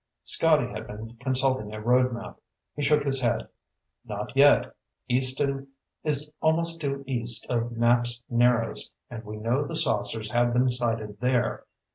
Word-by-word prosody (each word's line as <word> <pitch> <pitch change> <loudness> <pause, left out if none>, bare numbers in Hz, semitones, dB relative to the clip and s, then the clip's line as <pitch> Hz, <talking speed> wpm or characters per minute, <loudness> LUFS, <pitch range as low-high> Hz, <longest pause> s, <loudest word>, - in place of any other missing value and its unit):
Scotty - - +3
had - - -7
been 110 +2 -8
consulting 130 -4 0
a - - -6
road 125 +3 +2
map. 120 - -8 0.4
He 145 - -4
shook 150 +1 +2
his 135 -2 +1
head. 120 -2 0 0.6
"Not - - -6
yet. - - +4 0.3
Easton 135 +2 +2 0.4
is 150 0 -1
almost 165 +1 +1
due 140 -1 -3
east 120 -3 +2
of 120 -1 0
Knapps 120 +1 +1
Narrows, 120 - +1 0.2
and 115 -1 -7
we 105 0 -8
know 120 +6 0
the 145 - -6
saucers 110 -1 0
have 120 0 +2
been 125 +1 +3
sighted 115 -4 -2
there. 125 -1 0
120 Hz, 150 wpm, -26 LUFS, 115-135 Hz, 0.6 s, yet